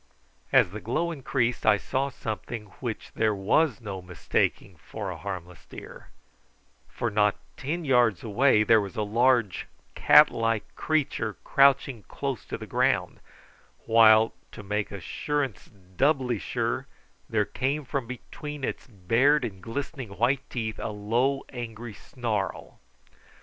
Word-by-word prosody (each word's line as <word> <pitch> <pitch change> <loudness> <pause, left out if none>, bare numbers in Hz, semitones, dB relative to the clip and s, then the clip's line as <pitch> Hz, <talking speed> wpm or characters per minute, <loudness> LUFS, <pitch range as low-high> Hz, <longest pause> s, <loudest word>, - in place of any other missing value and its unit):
As 90 - +5
the 105 - -6
glow 170 +9 -1
increased 130 -5 -1
I 110 -1 +5
saw 135 +7 -1
something 110 -3 -6
which 120 -4 -5
there 110 -2 +1
was 115 +8 +2
no 100 -4 -6
mistaking 90 0 -2
for 100 +4 -6
a - - -6
harmless 90 0 -7
deer, - - -11 0.8
for 120 - -3
not 105 -1 +3 0.2
ten 160 +5 -3
yards 120 - +3
away 115 0 +3
there 110 0 +5
was 100 -3 -6
a 110 - 0
large 115 -2 +2 0.3
cat - - +7
like 115 -2 -1
creature 135 -9 -1
crouching 135 -3 +3
close 135 -4 -4
to - - -5
the - - -8
ground, - - 0 0.7
while, 110 -1 +6 0.2
to 105 - -9
make 105 +1 -2
assurance 135 - -3 0.3
doubly 130 -4 +2
sure, - - -2 0.4
there - - +1
came 140 +3 -2
from 130 -2 -3
between 145 +3 -8
its - - -4
bared 120 +7 +2
and 95 -5 -7
glistening 120 - -6
white 130 +4 +1
teeth 110 -3 -4
a - - -3
low 115 +7 0
angry 120 -2 -7
snarl. 110 -4 -4
115 Hz, 135 wpm, -27 LUFS, 105-135 Hz, 0.8 s, cat